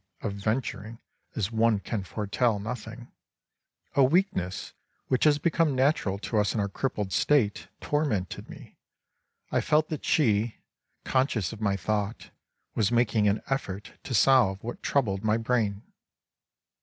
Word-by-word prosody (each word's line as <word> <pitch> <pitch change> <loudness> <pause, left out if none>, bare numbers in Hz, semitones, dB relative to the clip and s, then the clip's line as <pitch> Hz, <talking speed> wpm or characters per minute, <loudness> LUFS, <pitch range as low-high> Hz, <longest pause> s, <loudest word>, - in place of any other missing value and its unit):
} - - -35
of 105 - -2
venturing, 110 +1 -3 0.4
as 105 -1 -1
one 115 -1 +3
can 100 0 -4
foretell 105 +4 0
nothing), 115 +2 -7 0.8
a 140 - +5
weakness 130 - 0 0.4
which 130 - +2
has 150 -1 +5
become 155 -1 +1
natural 130 -7 +2
to 110 +2 -1
us 105 +1 +1
in - - 0
our 100 - +1
crippled 105 -2 -3
state, 110 0 +2
tormented 130 -12 -2
me, - - -13 0.7
I - - +2
felt 155 +1 +2
that 155 - -4
she, 110 -6 +2 0.5
conscious 130 - 0
of 110 - -10
my 100 -2 +1
thought, 105 +3 -2 0.4
was 105 -2 +1
making 115 -3 +3
an 100 +1 +1
effort 105 -8 -3
to 125 - -2
solve 110 -6 +4
what 120 - -6
troubled 105 -8 0
my 110 0 +2
brain. 115 -3 0
110 Hz, 145 wpm, -27 LUFS, 100-130 Hz, 0.8 s, a